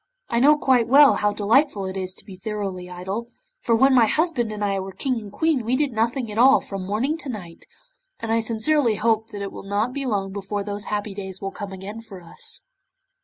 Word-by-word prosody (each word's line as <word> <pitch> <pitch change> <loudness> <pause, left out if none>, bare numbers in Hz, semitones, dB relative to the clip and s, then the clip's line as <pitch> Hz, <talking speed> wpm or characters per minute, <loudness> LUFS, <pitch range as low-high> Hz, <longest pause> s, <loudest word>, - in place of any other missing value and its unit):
I 235 - +1
know 295 +4 +6
quite 255 -5 +3
well 280 +3 +7
how 210 0 +1
delightful 210 +1 +2
it 190 0 -5
is 185 -1 -3
to - - -10
be 195 - -10
thoroughly 190 -2 -5
idle, 190 +6 -5 0.3
for 230 - +2
when 265 +4 +5
my 240 -3 +6
husband 300 -6 +1
and 210 -1 -2
I 195 -1 0
were 190 0 -5
King 255 0 -1
and 205 -2 -10
Queen 315 -1 +1
we 235 +3 +1
did 285 0 +1
nothing 230 +1 -1
at 210 - -3
all 270 +3 +7
from 195 -2 -6
morning 260 +11 -1
to 290 - -5
night, 180 -8 -8 0.5
and 225 - -3
I 225 - +3
sincerely 230 +2 +2
hope 220 +1 +1
that 205 -2 -6
it 195 - -5
will - - -8
not 205 +5 -1
be 275 -1 -3
long 195 -4 -1
before 200 0 -3
those 205 0 -5
happy 205 -1 -3
days 190 -1 -7
will 195 0 -4
come 200 0 -7
again 195 +4 -7
for 205 -4 -11
us. 450 - -5
215 Hz, 225 wpm, -23 LUFS, 195-255 Hz, 0.5 s, well